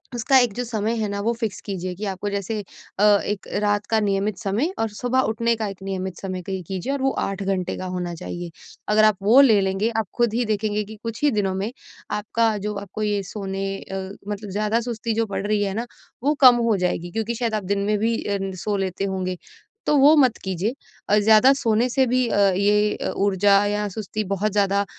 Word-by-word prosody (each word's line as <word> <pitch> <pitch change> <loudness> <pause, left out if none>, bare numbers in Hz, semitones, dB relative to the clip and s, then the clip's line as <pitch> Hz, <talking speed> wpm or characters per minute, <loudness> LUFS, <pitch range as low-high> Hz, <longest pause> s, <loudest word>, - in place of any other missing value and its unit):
उसका 260 +3 +3
एक 245 -4 +2
जो 245 - -3
समय 225 -1 -2
है 215 - -1
ना, 200 - -3
वो 230 - +1
फिक्स 220 -4 -3
कीजिए 185 -2 -4
कि 210 +4 -5
आपको 195 +1 -3
जैसे 200 +2 -3 0.4
अ, - - +3 0.2
एक 205 -1 -3
रात 205 0 +1
का 220 - +4
नियमित 200 -1 0
समय 225 - -1
और 225 - 0
सुबह 245 +5 -1
उठने 230 +1 +1
का 220 -1 -3
एक 195 -1 -8
नियमित 190 -2 -4
समय 185 -2 -4
तय 190 -1 -3
कीजिए 195 +8 -3
और 280 - -3
वो 270 0 +2
8 195 0 -4
घंटे 190 -2 -1
का 185 - -5
होना 175 -1 -3
चाहिए। 175 +1 -6 0.4
अगर 215 +1 +4
आप 215 -2 +3
वो 230 +6 +6
ले 225 -7 +6
लेंगे, 195 +3 0
आप 225 -3 -2
खुद 240 -3 +1
ही 245 - +1
देखेंगे 210 0 -1
कि 220 - -10
कुछ 230 +2 -5
ही 290 - +4
दिनों 200 -4 0
में 200 +5 -2 0.5
आपका 225 0 +1
जो 210 +1 -3
आपको 200 +2 -5
ये 205 -1 0
सोने 195 -1 -3
अ, 190 0 -6 0.2
मतलब 205 0 -5
ज़्यादा 210 +3 0
सुस्ती 230 -1 -3
जो 225 +1 +1
बढ़ 200 0 -3
रही 210 -1 +1
है 195 -1 -2
ना, 230 +3 -3 0.4
वो 290 - +3
कम 250 -2 +9
हो 215 - +3
जाएगी 175 -1 -2
क्योंकि 225 +2 -2
शायद 230 -1 -2
आप 210 - -2
दिन 200 +2 -1
में 210 0 +1
भी 230 +1 +1
अ, 200 -1 -1
न 195 0 -3
सो 210 -1 0
लेते 195 0 -2
होंगे, 185 -2 -3 0.5
तो 300 - +4
वो 290 +3 +7
मत 255 -5 +4
कीजिए। 190 +5 -2 0.4
और 210 - +6
ज़्यादा 220 +5 +6
सोने 230 -2 +1
से 265 +2 +2
भी 250 0 +2
अ, - - 0 0.2
ये 210 +1 +2
अ, - - -3
ऊर्जा 200 +1 +3
या 205 0 -1
सुस्ती 215 +2 -4
बहुत 200 +2 -1
ज़्यादा 200 0 +2
210 Hz, 225 wpm, -23 LUFS, 195-225 Hz, 0.5 s, कम